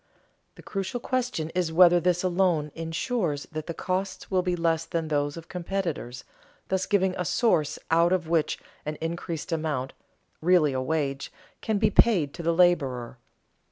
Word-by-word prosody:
The -, -, -14 dB
crucial 195 Hz, +5 st, -3 dB
question 245 Hz, -11 st, -2 dB
is 175 Hz, -3 st, -1 dB
whether 175 Hz, +1 st, +6 dB
this 175 Hz, 0 st, +1 dB
alone 175 Hz, -5 st, +1 dB
insures 165 Hz, -, -2 dB
that 155 Hz, -1 st, -5 dB
the 170 Hz, -, -3 dB
costs 185 Hz, +1 st, -3 dB
will 185 Hz, -1 st, +3 dB
be 180 Hz, -1 st, -1 dB
less 165 Hz, -1 st, +1 dB
than 165 Hz, -2 st, -3 dB
those 145 Hz, 0 st, 0 dB
of 165 Hz, -, -9 dB
competitors, 170 Hz, -9 st, -4 dB, 0.5 s
thus 190 Hz, 0 st, 0 dB
giving 190 Hz, -2 st, +2 dB
a -, -, +1 dB
source 165 Hz, -, +1 dB
out 170 Hz, +2 st, +4 dB
of 180 Hz, -3 st, +1 dB
which 165 Hz, -2 st, +1 dB, 0.3 s
an 150 Hz, +1 st, -4 dB
increased 165 Hz, 0 st, -4 dB
amount, 155 Hz, -5 st, -2 dB, 0.5 s
really 165 Hz, -4 st, +4 dB
a 130 Hz, -, -1 dB
wage, 140 Hz, -1 st, -2 dB, 0.3 s
can 220 Hz, -2 st, 0 dB
be 210 Hz, 0 st, +2 dB
paid 180 Hz, -11 st, +4 dB
to 170 Hz, -, -7 dB
the 170 Hz, 0 st, +1 dB
laborer. 135 Hz, -9 st, +2 dB
170 Hz, 160 wpm, -26 LUFS, 155-185 Hz, 0.5 s, whether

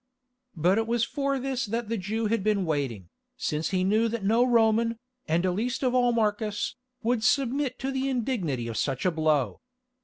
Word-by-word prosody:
But 180 Hz, +6 st, +3 dB
it 225 Hz, -, -1 dB
was 235 Hz, 0 st, +1 dB
for 275 Hz, +2 st, -1 dB
this 265 Hz, -1 st, -2 dB
that 230 Hz, +2 st, -2 dB
the 230 Hz, -, -1 dB
Jew 220 Hz, +3 st, -2 dB
had 215 Hz, -2 st, 0 dB
been 205 Hz, -3 st, +1 dB
waiting, 130 Hz, -, -2 dB, 0.3 s
since 155 Hz, +1 st, -1 dB
he 185 Hz, -1 st, +1 dB
knew 215 Hz, +4 st, +3 dB
that 230 Hz, -2 st, -3 dB
no 225 Hz, +5 st, +4 dB
Roman, 230 Hz, -1 st, +3 dB, 0.3 s
and 170 Hz, +3 st, +1 dB
least 225 Hz, +9 st, -1 dB
of 250 Hz, -1 st, +2 dB
all 245 Hz, -1 st, +4 dB
Marcus, 215 Hz, -2 st, -1 dB, 0.3 s
would 230 Hz, -1 st, +1 dB
submit 270 Hz, +1 st, +1 dB
to 270 Hz, 0 st, -3 dB
the 265 Hz, 0 st, -1 dB
indignity 205 Hz, -, -1 dB
of 115 Hz, -, -4 dB
such 135 Hz, +2 st, -1 dB
a 185 Hz, -, +4 dB
blow. 155 Hz, -5 st, +1 dB
220 Hz, 185 wpm, -27 LUFS, 180-245 Hz, 0.3 s, no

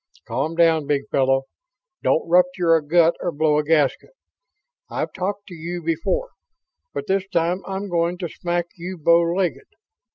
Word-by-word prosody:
"Calm 155 Hz, +5 st, -2 dB
down, 165 Hz, -3 st, +3 dB
big 140 Hz, -1 st, 0 dB
fellow. 135 Hz, 0 st, +2 dB, 0.6 s
Don't 160 Hz, -, +1 dB
rupture 180 Hz, -1 st, +3 dB
a 160 Hz, -2 st, +3 dB
gut 165 Hz, +2 st, +4 dB
or 175 Hz, -, -2 dB
blow 150 Hz, -1 st, +2 dB
a -, -, 0 dB
gasket. 150 Hz, -, +1 dB, 0.8 s
I've -, -, -3 dB
talked 200 Hz, +2 st, -3 dB
to -, -, -9 dB
you 170 Hz, +1 st, -6 dB
before, 165 Hz, -, -1 dB, 0.6 s
but 140 Hz, 0 st, -5 dB
this 190 Hz, +2 st, 0 dB
time 170 Hz, +2 st, 0 dB
I'm 195 Hz, +1 st, -4 dB
going 175 Hz, -1 st, 0 dB
to 175 Hz, -1 st, -4 dB
smack 175 Hz, +1 st, -2 dB
you 180 Hz, +2 st, -6 dB
bow 170 Hz, +2 st, +5 dB
legged. 170 Hz, -5 st, -1 dB
170 Hz, 160 wpm, -22 LUFS, 155-180 Hz, 0.8 s, bow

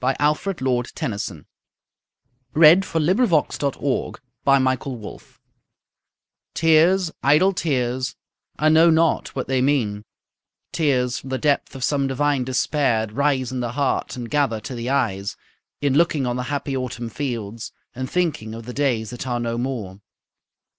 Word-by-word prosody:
What 130 Hz, +1 st, +1 dB
I 145 Hz, -, +2 dB
am 150 Hz, -, +6 dB
about 130 Hz, -8 st, -2 dB
to 105 Hz, -, -5 dB, 1.1 s
read 165 Hz, +4 st, +7 dB
is -, -, -10 dB
from 160 Hz, -2 st, 0 dB
his 200 Hz, +6 st, +2 dB
last 155 Hz, -3 st, +1 dB
long 140 Hz, -1 st, +1 dB
poem, 140 Hz, 0 st, -2 dB, 0.3 s
"The 140 Hz, 0 st, +5 dB
Princess:" 130 Hz, -3 st, -3 dB, 1.2 s
Tears, 165 Hz, +2 st, +4 dB
idle 155 Hz, +8 st, +4 dB
tears, 130 Hz, -, -1 dB, 0.4 s
I 155 Hz, -, +3 dB
know 160 Hz, +2 st, +6 dB
not 160 Hz, 0 st, +2 dB
what 130 Hz, -, -3 dB
they 130 Hz, -1 st, +1 dB
mean, 120 Hz, -7 st, 0 dB, 0.7 s
Tears 130 Hz, -6 st, +1 dB
from 135 Hz, -, -10 dB
the 130 Hz, -, -1 dB
depth 145 Hz, 0 st, 0 dB
of 130 Hz, -, -5 dB
some 140 Hz, -1 st, +1 dB
divine 140 Hz, 0 st, +1 dB
despair 130 Hz, -3 st, +1 dB
Rise 135 Hz, 0 st, 0 dB
in 130 Hz, -, -3 dB
the 120 Hz, -1 st, -3 dB
heart, 140 Hz, -1 st, -1 dB
and 120 Hz, -2 st, -6 dB
gather 140 Hz, -5 st, 0 dB
to 130 Hz, -, -7 dB
the 120 Hz, 0 st, -4 dB
eyes, 100 Hz, -8 st, -1 dB, 0.4 s
In 140 Hz, -2 st, +1 dB
looking 150 Hz, -2 st, +2 dB
on 120 Hz, 0 st, -1 dB
the 125 Hz, -, -2 dB
happy 140 Hz, -1 st, -2 dB
Autumn 120 Hz, -2 st, -4 dB
fields, 115 Hz, -4 st, -5 dB, 0.2 s
And 130 Hz, +1 st, -5 dB
thinking 150 Hz, -12 st, -1 dB
of 115 Hz, 0 st, -9 dB
the 125 Hz, -, -7 dB
days 125 Hz, -6 st, 0 dB
that 125 Hz, +1 st, -6 dB
are 120 Hz, -1 st, -1 dB
no 120 Hz, 0 st, -2 dB
more. 115 Hz, -7 st, -4 dB
130 Hz, 160 wpm, -22 LUFS, 120-150 Hz, 1.2 s, read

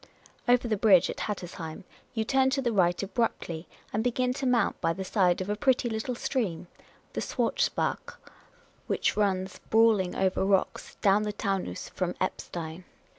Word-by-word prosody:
Over 245 Hz, 0 st, +4 dB
the 215 Hz, -2 st, 0 dB
bridge 195 Hz, -4 st, +5 dB
at -, -, -8 dB
Hattersheim 175 Hz, -5 st, -5 dB, 0.3 s
you 220 Hz, -1 st, 0 dB
turn 265 Hz, +2 st, +3 dB
to 270 Hz, +1 st, 0 dB
the 240 Hz, -, +1 dB
right 180 Hz, -3 st, +2 dB
abruptly, 190 Hz, -6 st, -2 dB, 0.3 s
and 215 Hz, +2 st, 0 dB
begin 250 Hz, +1 st, +1 dB
to 265 Hz, +1 st, -2 dB
mount 240 Hz, -4 st, +1 dB
by 165 Hz, -1 st, +2 dB
the 190 Hz, -, -5 dB
side 185 Hz, -2 st, +2 dB
of 185 Hz, -, -3 dB
a -, -, 0 dB
pretty 255 Hz, +1 st, +2 dB
little 225 Hz, +3 st, -2 dB
stream, 220 Hz, -, -2 dB, 0.5 s
the -, -, -2 dB
Schwarzbach, -, -, -1 dB, 0.7 s
which -, -, +1 dB
runs 190 Hz, -2 st, 0 dB
brawling 220 Hz, -5 st, +4 dB
over 190 Hz, 0 st, +1 dB
rocks 195 Hz, -1 st, 0 dB
down 200 Hz, +1 st, +5 dB
the 210 Hz, 0 st, -1 dB
Taunus 195 Hz, -, -3 dB
from -, -, -2 dB
Eppstein. 165 Hz, +1 st, -4 dB
205 Hz, 160 wpm, -28 LUFS, 185-235 Hz, 0.7 s, bridge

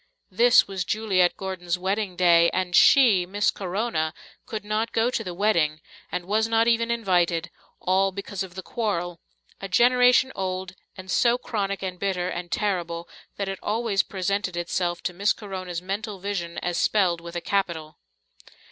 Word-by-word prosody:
This 240 Hz, +6 st, +5 dB
was 190 Hz, -2 st, -3 dB
Juliet 190 Hz, -2 st, +1 dB
Gordon's 185 Hz, -2 st, -3 dB
wedding 190 Hz, +1 st, -2 dB
day, 170 Hz, -1 st, +5 dB
and 185 Hz, -1 st, -1 dB
she, 215 Hz, -10 st, +6 dB
Miss 205 Hz, +3 st, +1 dB
Corona, 180 Hz, -4 st, -2 dB, 0.3 s
could 215 Hz, -2 st, -5 dB
not 215 Hz, +2 st, -1 dB
go 230 Hz, +2 st, +2 dB
to 225 Hz, -, -2 dB
the 180 Hz, -4 st, -6 dB
wedding 170 Hz, -6 st, +1 dB, 0.3 s
and 175 Hz, -, -3 dB
was 215 Hz, +3 st, +1 dB
not 225 Hz, 0 st, +2 dB
even 230 Hz, 0 st, +2 dB
invited, 175 Hz, -7 st, +1 dB, 0.3 s
all 190 Hz, +1 st, +2 dB
because 200 Hz, 0 st, -6 dB
of 185 Hz, -2 st, -6 dB
the 190 Hz, -, -6 dB
Quarrel, 175 Hz, -7 st, -3 dB, 0.4 s
a 195 Hz, -, -5 dB
generation 250 Hz, +5 st, +4 dB
old, 185 Hz, -1 st, -4 dB, 0.2 s
and 185 Hz, 0 st, -8 dB
so 235 Hz, +4 st, +3 dB
chronic 200 Hz, -5 st, -3 dB
and 180 Hz, -1 st, -4 dB
bitter 185 Hz, -2 st, -1 dB
and 175 Hz, -1 st, -5 dB
terrible 170 Hz, -5 st, -2 dB, 0.3 s
that 200 Hz, -, -2 dB
it 195 Hz, -1 st, -4 dB
always 215 Hz, -2 st, 0 dB
presented 190 Hz, -1 st, -2 dB
itself 175 Hz, 0 st, -2 dB
to 180 Hz, -, -2 dB
Miss 200 Hz, +4 st, +2 dB
Corona's 185 Hz, -4 st, -6 dB
mental 200 Hz, +2 st, -4 dB
vision 180 Hz, -3 st, -4 dB
as 175 Hz, -1 st, -1 dB
spelled 180 Hz, -5 st, +2 dB
with 170 Hz, 0 st, -9 dB
a -, -, -1 dB
capital. 170 Hz, -6 st, -2 dB
190 Hz, 165 wpm, -25 LUFS, 175-210 Hz, 0.4 s, she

